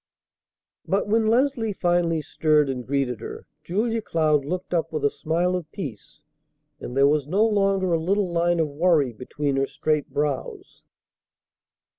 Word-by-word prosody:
But 195 +2 0
when 220 +1 +2
Leslie 235 -2 +1
finally 175 -3 +1
stirred 150 -2 +2
and 125 -2 -6
greeted 135 -4 -1
her, 115 - -8 0.2
Julia 220 +7 -1
Cloud 155 -7 +1
looked 180 +4 -4
up 165 -1 0
with 155 -2 -2
a 145 - +3
smile 175 +3 0
of 165 -4 -5
peace; 130 - -8 0.6
and 125 - -6
there 140 0 +6
was 145 -1 +1
no 200 +7 +3
longer 195 -4 +1
a 165 - +2
little 190 +2 0
line 170 0 +1
of 160 - +2
worry 150 -3 +2
between 135 +4 -3
her 135 0 +1
straight 155 -2 -1
brows. 145 -2 -3
165 Hz, 155 wpm, -24 LUFS, 145-190 Hz, 0.6 s, there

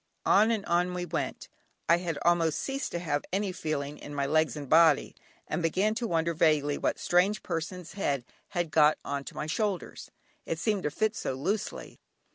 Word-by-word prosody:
On 215 +3 +5
and 220 -3 0
on 175 +1 +1
we 180 0 -2
went. 170 -1 -3 0.4
I 170 - +6
had 170 -4 -3
almost 170 -2 +3
ceased 275 +1 -3
to - - 0
have 150 -4 -1
any 195 +1 0
feeling 150 -5 -3
in 145 - -8
my 140 -1 0
legs 155 -2 +2
and 145 -2 -6
body, 160 0 +4 0.3
and 155 - -2
began 190 +6 +1
to 230 +1 -2
wonder 170 -2 +1
vaguely 150 -3 +2
what - - 0
strange 185 +4 +2
person's 175 0 -4
head 140 -10 -1 0.2
had 175 -4 -2
got 150 -1 +5
on 140 -1 -3
to - - -9
my - - -3
shoulders, 195 +3 -3 0.3
it 165 - -3
seemed 205 +3 0
to 150 - -1
fit 215 +8 0
so 130 - -3
loosely. 195 +10 -3
170 Hz, 190 wpm, -29 LUFS, 150-190 Hz, 0.4 s, I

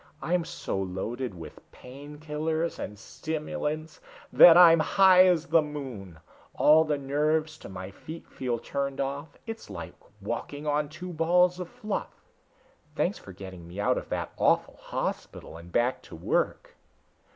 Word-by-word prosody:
I'm 170 +1 0
so 95 - -4
loaded 95 +5 -4
with 85 -2 -10
pain 140 +4 -11
killers 155 +2 -2
and 105 - -6
stimulants 155 +5 -4 0.3
that 170 -1 +9
I'm 165 -2 +8
high 185 +2 +6
as 170 -3 +2
the 165 -1 +4
moon. 130 - -7 0.4
All 155 +2 +6
the 150 -2 -1
nerves 155 +3 0
to - - -10
my 95 0 -7
feet 160 - -10
feel 125 -3 -3
turned 140 +3 -4
off 140 +2 -4
it's 225 0 -7
like - - -7 0.3
walking 145 +1 -5
on 150 0 0
two 180 +3 -8
balls 180 +2 +3
of 180 -2 -5
fluff. 215 -1 -4 0.9
Thanks - - 0
for - - -12
getting 95 -2 -10
me 90 +4 -9
out 105 - +2
of - - -12
that - - -3
awful - - +2
hospital - - -5
and 85 +1 -12
back 120 +6 +1
to - - -12
work." 80 - -1
150 Hz, 150 wpm, -27 LUFS, 120-160 Hz, 0.9 s, that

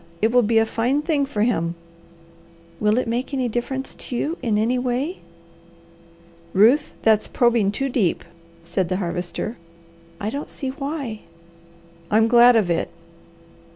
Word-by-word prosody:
It 220 +4 +2
will 245 0 +5
be 225 0 +2
a 225 - +5
fine 245 +6 0
thing 295 -4 +1
for 215 -6 -1
him." 170 -8 0 1.0
"Will 210 +1 +2
it 250 - 0
make 245 +4 -2
any 255 -2 0
difference 250 +3 -3
to 245 - -7
you 305 +7 -1
in 225 -5 0
any 235 +4 +1
way?" 255 +7 -2 1.3
"Ruth, 240 +10 +4
that's 220 -1 +3
probing 235 -5 +2
too 270 +6 -2
deep," 225 -10 0 0.4
said 175 +1 -1
the 185 - 0
Harvester. 180 +4 -4 0.6
"I 215 +1 -3
don't 285 +3 -5
see 270 - -5
why!" 275 -4 -4 0.9
"I'm 220 +2 +4
glad 240 +1 +7
of 200 -6 +2
it!" 165 - 0
235 Hz, 150 wpm, -22 LUFS, 210-260 Hz, 1.3 s, glad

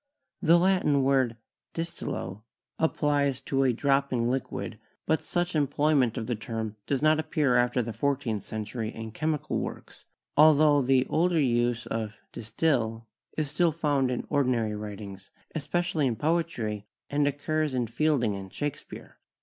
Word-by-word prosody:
The 170 +2 +6
Latin 175 -6 +3
word 130 -4 +2 0.4
"distillo" 110 - -4 0.4
applies 145 -4 +1
to 135 0 0
a 130 -2 +4
dropping 125 -2 +1
liquid, 130 0 -4 0.3
but 160 - +1
such 175 -1 -1
em 145 -2 +3
ployment 140 -4 +2
of 115 - -2
the 120 - -1
term 110 -1 -4
does 140 0 0
not 155 0 +4
appear 150 -4 +1
after 120 0 +2
the 115 0 -5
fourteenth 125 -3 -1
century 110 +2 -4
in 110 -1 -7
chemical 150 +5 -1
works, - - -7 0.3
altho 150 -1 +6
the 130 0 +3
older 170 0 +2
use 120 -3 +1
of 110 -2 -3 0.2
"distil" 115 -2 -1 0.3
is 150 -3 -1
still 165 +2 +3
found 145 -4 +1
in 125 - -2
ordinary 120 -6 +1
writings, 100 -2 -8 0.2
especially 165 -1 0
in 120 - 0
poetry, 120 -9 -1 0.2
and 145 0 +2
occurs 145 0 -1
in 125 -1 +1
Fielding 120 -2 +1
and 95 -1 -8
Shakespeare. 145 -1 -6
135 Hz, 145 wpm, -28 LUFS, 115-155 Hz, 0.4 s, The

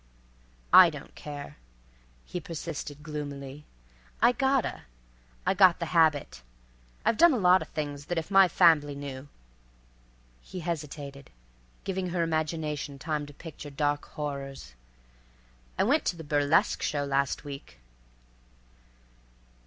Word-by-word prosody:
_" - - -33 0.7
"I - - +10
don't - - -10
care," 145 -1 -8 0.7
he 180 - -5
persisted 150 -3 -6
gloomily. 145 -1 -6 0.5
"I - - +6
gotta. 265 +1 0 0.6
I 185 - +3
got 185 -2 +6
the 170 0 -5
habit. 160 -4 +2 0.6
I've 225 - +2
done 340 +2 +7
a - - +1
lot 185 -2 +5
of - - -6
things 145 -2 -5
that 175 - -3
if 165 +4 -3
my 195 -1 +7
fambly 160 -5 +4
knew"—he - - -12
hesitated, 145 -4 -6 0.5
giving 190 -1 -2
her 175 -1 0
imagination 155 -3 -2
time 150 +2 -3
to 145 - -12
picture 155 -2 -9
dark 145 +1 -1
horrors—"I - - -8
went 285 +9 +3
to - - 0
the 165 - -9
burlesque 145 0 +2
show 145 -1 -1
last 140 0 0
week." 140 - -9
145 Hz, 120 wpm, -28 LUFS, 135-165 Hz, 0.7 s, I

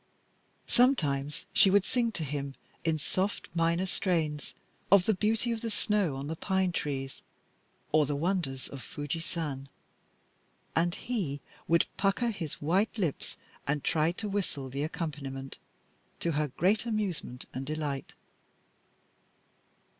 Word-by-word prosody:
Sometimes 150 - +3
she 200 - +7
would 195 0 +5
sing 235 -2 +2
to 165 - -2
him, 140 -1 -3 0.3
in 160 -1 +2
soft 185 +6 -1
minor 170 +2 +2
strains, 160 -6 0 0.4
of 195 -2 +8
the 220 - +4
beauty 220 +4 +1
of 225 -1 -1
the 230 - -2
snow 210 -8 +1
on 135 +1 -4
the 160 +2 -2
pine 190 +1 +1
trees, 135 -5 -3 0.7
or 155 -2 +5
the 145 - 0
wonders 150 -5 0
of 140 - -8
Fuji 145 +4 -3
San. 150 -5 -4 1.1
And 170 +1 +3
he 185 - -2 0.3
would 170 0 +5
pucker 200 +4 +2
his 170 -8 -4
white 190 +10 +1
lips 175 -9 -1 0.3
and 145 0 +1
try 155 +1 +3
to 210 +4 -4
whistle 185 -9 -2
the 140 +2 -3
accompaniment, 140 -4 -4 0.6
to 170 - +1
her 150 0 +1
great 195 - +2
amusement 195 - -2
and 130 - -3
delight. 145 -1 -3
165 Hz, 135 wpm, -31 LUFS, 145-195 Hz, 1.1 s, of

